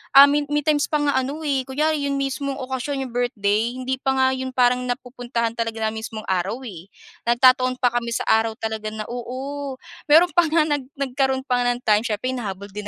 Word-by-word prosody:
ah, 275 - +12
may 290 0 +3
may 295 0 0
times 295 -1 +2
pa 305 - -2
nga 285 -2 +2
ano 285 +5 -4
eh, 275 -3 -1
kunyari 290 +1 0
'yong 280 - -1
mismong 275 0 -2
okasyon 265 +1 -3
'yong 255 - -7
birthday 230 -1 0
hindi 255 0 -3
pa 265 0 0
nga 260 0 +3
'yon, 260 0 -4
parang 250 0 +3
napupuntahan 245 -2 -3
talaga 225 -1 -3
ng 220 - -5
mismong 220 -1 -6
araw 190 +8 -1
eh, 190 -6 -9 0.4
nagtataon 255 +1 +4
pa 250 -1 +1
kami 235 -1 -2
sa - - -1
araw 225 0 +2
talaga 220 -2 -4
na 215 0 -4
oo. 265 +3 -5 0.3
Mayro'n 330 +4 +6
pa 345 -1 +3
nga 315 0 +3
nag 290 -4 -2
nagkaroon 265 -1 -1
pa 250 -2 0
nga 245 0 +1
ng 245 - -11
time 210 0 +3
siyempre 225 +4 -2
hinahabol 200 -5 -5
din 205 0 -6
255 Hz, 210 wpm, -22 LUFS, 230-275 Hz, 0.4 s, ah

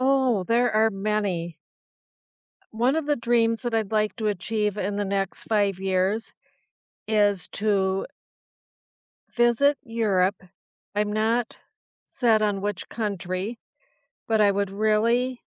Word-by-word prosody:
Oh, 260 -6 +2
there 240 +4 +2
are 220 +1 +3
many. 195 -5 -2 1.2
One 245 +6 +2
of 320 - -1
the 295 0 +1
dreams 230 -1 +1
that 240 -2 -2
I'd 220 -2 -1
like 215 -1 +1
to 220 -3 -1
achieve 210 +1 -1
in 200 +1 -2
the 205 - -1
next 195 -1 -2
5 205 -4 +1
years 190 +3 0 0.8
is 205 -3 +2
to 195 -2 0 1.3
visit 240 +4 +3
Europe. 205 -6 0 0.5
I'm 210 0 0
not 225 +2 0 0.5
set 225 -4 +2
on 205 -2 +1
which 205 -1 -4
country, 200 0 -3 0.7
but 220 -1 +2
I 205 -1 +5
would 200 0 -1
really 225 +5 +1
215 Hz, 125 wpm, -25 LUFS, 200-230 Hz, 1.3 s, I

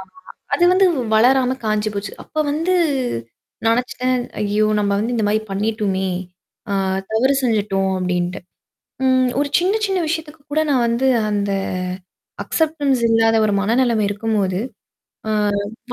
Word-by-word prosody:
ஆமா 190 - -13 0.4
அது 345 - +2
வந்து 380 +1 +5 0.3
வளராம 255 +3 +4
காஞ்சி 215 0 0
போச்சு. 200 0 -4
அப்ப - - -31 0.2
வந்து 330 +5 0 0.9
நெனச்சுட்டேன். 250 +2 +1 0.2
ஐயோ! 210 +1 +1
நம்ம 200 -1 0
வந்து 230 +4 -1
இந்த 225 - 0
மாரி 215 +1 +2
பண்ணிட்டோமே! 200 -2 -1 0.6
ஆ - - 0 0.4
தவறு 250 +5 +3
செஞ்சுட்டோம் 205 -5 +1
அப்டீன்ட்டு 180 0 -1 0.7
ம். 255 -1 +3
ஒரு 285 0 0
சின்ன 375 +4 +1
சின்ன 385 -2 0
விஷயத்துக்கு 315 -1 -4
கூட 310 +2 +2
நான் 260 -4 +3
வந்து 235 +3 +1 0.2
அந்த 205 -1 -1 0.9
அக்சப்டன்ஸ் 295 -5 0
இல்லாத 225 0 +3
ஒரு 210 - +1
மனநெலமை 230 +1 +2
இருக்கும்போது. 205 -3 -1 1.3
அ - - -2
225 Hz, 130 wpm, -20 LUFS, 205-265 Hz, 1.3 s, வந்து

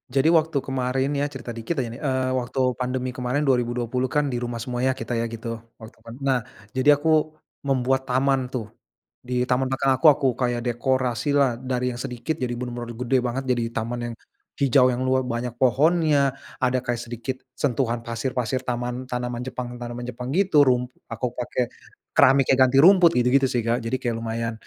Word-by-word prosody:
Jadi 135 +3 +2
waktu 160 -2 +2
kemarin 130 0 -1
ya 140 0 0
cerita 130 -4 -7
dikit 115 +9 -4
ya 130 -3 0
nih. 120 - -10
Eee, 130 -2 0
waktu 130 +1 -2 0.2
pandemi 125 0 -2
kemarin 130 +3 -1
2020 125 -1 0
kan 150 0 +1
di 120 -1 -2
rumah 120 -1 -3
semua 120 +1 -4
ya 130 +1 +2
kita 115 +1 -4
ya 115 - 0
gitu, 115 0 -6 0.2
waktu 110 -1 -13
pan 115 0 -10
nah, 135 -2 +2 0.3
jadi 145 +3 +5
aku 155 +3 -1 0.6
membuat 130 0 +1
taman 130 0 +1
tuh. 125 -4 -4 0.6
Di 125 0 -1
taman 130 +1 +1
belakang 135 0 +2
aku 160 - +4
aku 140 -2 +3
kayak 120 -1 -1
dekorasilah 130 +1 +1
dari 125 -1 -1
yang 120 - -6
sedikit 125 +4 -3
jadi 125 -1 -1
bener-bener 120 -1 -5
gede 125 +2 +1
banget. 125 +2 -2
Jadi 120 -1 -1
taman 115 +2 -2
yang - - -8 0.5
hijau 130 -1 +5
yang 125 - -3
lua 130 0 +2
banyak 120 -1 -3
pohonnya, 145 +1 +3 0.3
ada 130 0 +2
kayak 120 0 -1
sedikit 120 +2 -5 0.2
sentuhan 120 -3 -1
pasir-pasir 125 +1 -2
taman 125 +1 -3
tanaman 125 -1 -3
Jepang 125 -1 -5
tanaman 120 0 -6
Jepang 125 +1 -6
gitu, 180 -5 +4
rum 125 -1 +2 0.2
aku 115 +2 -3
pakai 125 0 -2 0.5
keramik 135 0 +5
yang 135 - +3
ganti 130 +1 +1
rumput 180 0 +7
gitu-gitu 125 +3 +4
sih, 125 -2 0
Kak. 115 +1 +2
Jadi 120 +3 0
kayak 120 -3 -1
lumayan, 115 0 -3
125 Hz, 180 wpm, -24 LUFS, 120-135 Hz, 0.6 s, rumput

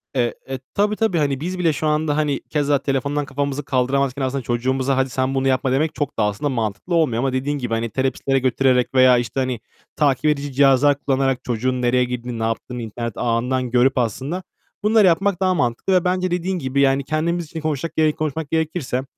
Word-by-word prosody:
Eee, 120 -2 +1 0.2
eee, 135 -1 -3
tabii, 210 +1 +1
tabii 220 -5 0
hani 140 -3 0
biz 180 +4 -4
bile 165 -3 +2
şu 155 - -2
anda 150 -1 +1
hani 150 -3 0
keza 145 -2 +1
telefondan 140 +2 -1
kafamızı 140 +1 -3
kaldıramazken 135 +1 0
aslında 135 +1 -1
çocuğumuza 130 +3 0
"Hadi 130 0 +1
sen 130 +1 -1
bunu 135 0 +1
yapma." 130 0 +1
demek 150 +4 0
çok 145 -4 -3
da - - +3
aslında 105 +8 -1
mantıklı 115 - -2
olmuyor. 145 -9 +2
Ama 135 +1 0
dediğin 140 +3 -1
gibi 120 -4 -3
hani 115 +1 -1
terapistlere 135 +2 0
götürerek 130 -1 +2
veya, 130 -1 +6
işte, 120 +2 -2
hani, 130 -3 -1 0.4
takip 145 -1 +1
edici 145 -2 +1
cihazlar 140 +1 +4
kullanarak 135 -2 0
çocuğun 125 +2 -1
nereye 125 +1 +3
girdiğini, 125 -1 -4
ne - - -2
yaptığını 115 +2 -3
internet 115 +1 -5
ağından 125 +2 0
görüp 125 +2 +3
aslında, 130 - -2 0.4
bunları 215 -1 +5
yapmak 190 +2 +2
daha 185 -1 +3
mantıklı. 125 +4 0
Ve 180 -2 +4
bence 185 0 0
dediğin 180 +1 -1
gibi 135 -1 0
yani 135 0 +3
kendimiz 165 +4 -1
için 155 - -20
de - - -8
konuşacak, 155 +1 -2
yeri 155 -1 +3
konuşmak 155 -1 -3
gerekirse, 160 -5 -1
135 Hz, 200 wpm, -21 LUFS, 125-155 Hz, 0.4 s, veya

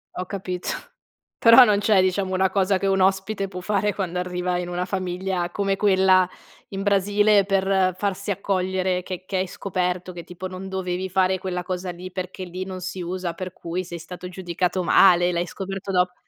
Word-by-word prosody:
Ho 180 - -3
capito. 185 -2 -4 0.7
Però 230 +2 +9
non 210 -3 +3
c'è, 205 -2 +4
diciamo, 185 +1 0
una 190 0 +2
cosa 195 0 +2
che 195 - -3
un 195 0 +2
ospite 195 +2 +1
può 180 -1 -7
fare 205 +2 0
quando 180 -3 -2
arriva 180 0 -2
in 175 0 -4
una 175 +1 -2
famiglia 185 -1 -2
come 195 +1 0
quella 190 -2 +4 0.4
in 195 0 -4
Brasile 205 +1 +3
per 190 -2 +2
farsi 200 +1 -2
accogliere, 185 -1 -1
che 185 0 -6
che 190 - -2
hai 185 +1 0
scoperto 180 -1 -3
che 170 -1 -8
tipo 180 +2 -7
non 185 +1 -7
dovevi 190 0 -3
fare 185 0 +2
quella 180 -1 -3
cosa 180 0 -4
lì 180 +1 -9
perché 185 0 -5
lì 180 +1 -5
non 185 -1 -6
si 185 +1 -5
usa, 175 0 -3
per 185 +2 -6
cui 175 +1 -4
sei 175 -1 -7
stato 180 +2 -8
giudicato 180 0 -2
male 175 0 +5
e - - 0
l'hai 170 +1 0
scoperto 195 +1 -5
dop 180 -1 +2
185 Hz, 190 wpm, -23 LUFS, 180-195 Hz, 0.7 s, Però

